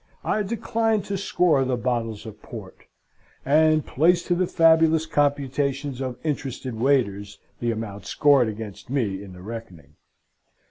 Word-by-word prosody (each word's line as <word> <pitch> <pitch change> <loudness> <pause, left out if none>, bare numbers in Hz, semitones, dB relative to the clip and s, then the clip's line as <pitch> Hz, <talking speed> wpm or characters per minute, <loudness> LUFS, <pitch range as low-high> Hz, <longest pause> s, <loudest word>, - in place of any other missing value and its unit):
I 215 - 0
decline 225 +1 0
to 200 - -4
score 180 -7 +2
the 130 -1 -1
bottles 115 -3 -2
of 110 - -10
port: - - -11 0.6
and 155 +1 +4
place 170 +5 +2
to 175 - 0
the 180 +1 +1
fabulous 160 -1 +4
computations 140 -2 -1
of 130 -2 -4
interested 135 -4 -3
waiters, 110 -5 0 0.2
the 120 - -1
amount 110 -3 -5
scored 140 -5 +4
against 110 +1 -7
me 110 -8 -1
in 95 -2 -11
the 90 0 -12
reckoning. 95 -10 -9
135 Hz, 140 wpm, -24 LUFS, 110-160 Hz, 0.6 s, and